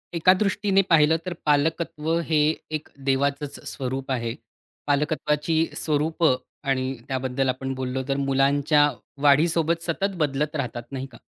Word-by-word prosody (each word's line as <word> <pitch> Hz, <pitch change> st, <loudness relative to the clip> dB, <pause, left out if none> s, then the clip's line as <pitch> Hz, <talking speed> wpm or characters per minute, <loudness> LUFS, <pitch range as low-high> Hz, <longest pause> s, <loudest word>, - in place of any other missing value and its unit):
एका 180 Hz, +3 st, +5 dB
दृष्टीने 195 Hz, 0 st, +2 dB
पाहिलं 160 Hz, -1 st, +5 dB
तर 180 Hz, -, -3 dB
पालकत्व 155 Hz, +1 st, 0 dB, 0.2 s
हे 160 Hz, -, +2 dB, 0.3 s
एक 155 Hz, -1 st, -4 dB, 0.2 s
देवाचंच 140 Hz, +1 st, 0 dB
स्वरूप 135 Hz, 0 st, -4 dB
आहे. 115 Hz, -3 st, -1 dB, 0.5 s
पालकत्वाची 150 Hz, +2 st, 0 dB, 0.2 s
स्वरूपं 155 Hz, -1 st, +1 dB, 0.3 s
आणि 130 Hz, -1 st, +1 dB, 0.2 s
त्याबद्दल 130 Hz, 0 st, -1 dB
आपण 135 Hz, +1 st, -2 dB
बोललो, 130 Hz, 0 st, -2 dB
तर 135 Hz, -1 st, 0 dB
मुलांच्या 140 Hz, +2 st, +3 dB, 0.3 s
वाढीसोबत 160 Hz, +3 st, +3 dB
सतत 195 Hz, +4 st, -1 dB
बदलत 150 Hz, -1 st, -1 dB
राहतात 120 Hz, -4 st, -3 dB
नाही 135 Hz, -1 st, -4 dB
का? 115 Hz, -, -13 dB
145 Hz, 125 wpm, -24 LUFS, 135-160 Hz, 0.5 s, एका